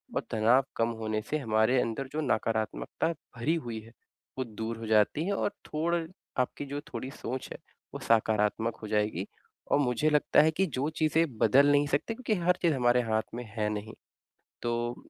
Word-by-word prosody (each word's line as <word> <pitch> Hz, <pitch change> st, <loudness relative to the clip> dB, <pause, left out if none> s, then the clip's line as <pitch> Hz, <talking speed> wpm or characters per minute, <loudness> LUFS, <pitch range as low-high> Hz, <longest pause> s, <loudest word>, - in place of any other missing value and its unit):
और -, -, +1 dB
तनाव 115 Hz, +5 st, +4 dB
कम 115 Hz, 0 st, +1 dB
होने 110 Hz, -1 st, -1 dB
से 155 Hz, -, +1 dB
हमारे 110 Hz, 0 st, +2 dB
अंदर 115 Hz, +4 st, -3 dB
जो 155 Hz, -, -1 dB
नकारात्मकता 110 Hz, +4 st, -1 dB
भरी 150 Hz, -1 st, -3 dB
हुई 120 Hz, -8 st, -4 dB
है, 115 Hz, +1 st, -15 dB, 0.5 s
वो 130 Hz, -, 0 dB
दूर 110 Hz, +1 st, -5 dB
हो 115 Hz, -, -7 dB
जाती 110 Hz, +8 st, +3 dB
है 200 Hz, -, 0 dB
और 200 Hz, -, 0 dB
थोड़ 165 Hz, +3 st, 0 dB, 0.4 s
आपकी 125 Hz, +3 st, -1 dB
जो 140 Hz, +1 st, -4 dB
थोड़ी 130 Hz, +3 st, -4 dB
सोच 130 Hz, 0 st, -5 dB
है, -, -, -6 dB, 0.4 s
वो -, -, -5 dB
सकारात्मक 110 Hz, 0 st, +1 dB
हो 110 Hz, -, -6 dB
जाएगी। 105 Hz, -3 st, 0 dB, 0.4 s
और -, -, +5 dB
मुझे 140 Hz, +2 st, +2 dB
लगता 150 Hz, 0 st, +4 dB
है 155 Hz, +1 st, +4 dB
कि 190 Hz, +5 st, +1 dB
जो 145 Hz, -3 st, -2 dB
चीज़ें 160 Hz, +1 st, +2 dB
बदल 135 Hz, +7 st, +5 dB
नहीं 145 Hz, 0 st, +4 dB
सकते 145 Hz, +10 st, 0 dB
क्योंकि 225 Hz, -1 st, -2 dB
हर 180 Hz, +1 st, +3 dB
चीज़ 170 Hz, -3 st, +3 dB
हमारे 125 Hz, -1 st, +3 dB
हाथ 110 Hz, -2 st, 0 dB
में 120 Hz, -, -4 dB
है 105 Hz, -2 st, 0 dB
नहीं। 105 Hz, +1 st, -5 dB, 0.7 s
तो 120 Hz, 0 st, -1 dB
120 Hz, 185 wpm, -29 LUFS, 110-150 Hz, 0.7 s, और